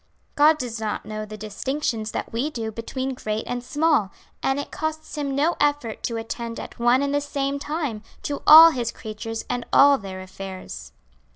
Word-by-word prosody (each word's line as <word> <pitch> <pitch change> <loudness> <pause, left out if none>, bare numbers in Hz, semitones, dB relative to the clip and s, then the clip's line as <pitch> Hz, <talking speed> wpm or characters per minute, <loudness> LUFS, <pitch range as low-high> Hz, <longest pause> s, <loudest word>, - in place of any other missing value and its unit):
God 305 +2 +5
does 240 -5 -4
not 215 -1 -3
know 215 0 -5
the 215 0 -8
distinctions 220 +2 -3
that - - -5
we 250 +6 0
do 225 -6 -4
between 260 +4 -4
great 215 -3 -3
and 245 0 -4
small, 295 -8 +1 0.3
and 270 +1 +1
it 285 - -6
costs 315 0 -4
Him 280 -2 -2
no 305 +5 +2
effort 290 -6 0
to 230 - -2
attend 230 +1 -5
at - - -9
one 240 +3 +4
and 280 0 -1
the 290 - +2
same 280 -1 -2
time, 290 -7 -3 0.2
to 285 - -3
all 325 +2 +11
His 240 -5 -2
creatures 225 +1 -6
and 245 -1 -2
all 280 0 +6
their 190 -2 -7
affairs." 185 - -8
245 Hz, 185 wpm, -24 LUFS, 220-290 Hz, 0.3 s, all